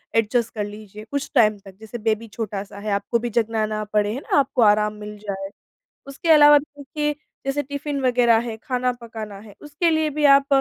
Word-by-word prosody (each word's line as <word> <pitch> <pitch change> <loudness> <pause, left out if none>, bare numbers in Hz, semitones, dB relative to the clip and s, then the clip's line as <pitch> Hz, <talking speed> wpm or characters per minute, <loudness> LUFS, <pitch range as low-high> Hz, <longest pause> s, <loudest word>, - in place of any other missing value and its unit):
Adjust 225 +1 +1
कर 210 - -2
लीजिए 210 0 -10
कुछ 280 0 -2
टाइम 215 -3 +4
तक, 195 -1 -12
जैसे 220 +2 -8
बेबी 225 0 -1
छोटा-सा 205 -2 -6
है 210 0 -4
आपको 200 +4 0
भी 240 +1 -3
जगना 225 -1 0
ना 215 0 -3
पड़े, 210 0 +2
है 260 - -4
ना? - - 0
आपको 265 -3 0
आराम 210 0 +4
मिल 210 0 -9
जाए। 195 -2 -5 0.6
उसके 275 +4 -6
अलावा 295 -1 +8
देखिए, 295 +1 -4 0.3
जैसे 280 +2 0
टिफ़िन 285 +1 -4
वग़ैरह 245 -3 +4
है, 220 - -5
खाना 250 -1 0
पकाना 220 -3 -8
है, 205 -1 -14
उसके 300 +3 0
लिए 315 -1 +1
भी 295 +1 -2
आप 275 -1 +6
230 Hz, 200 wpm, -22 LUFS, 210-275 Hz, 0.6 s, अलावा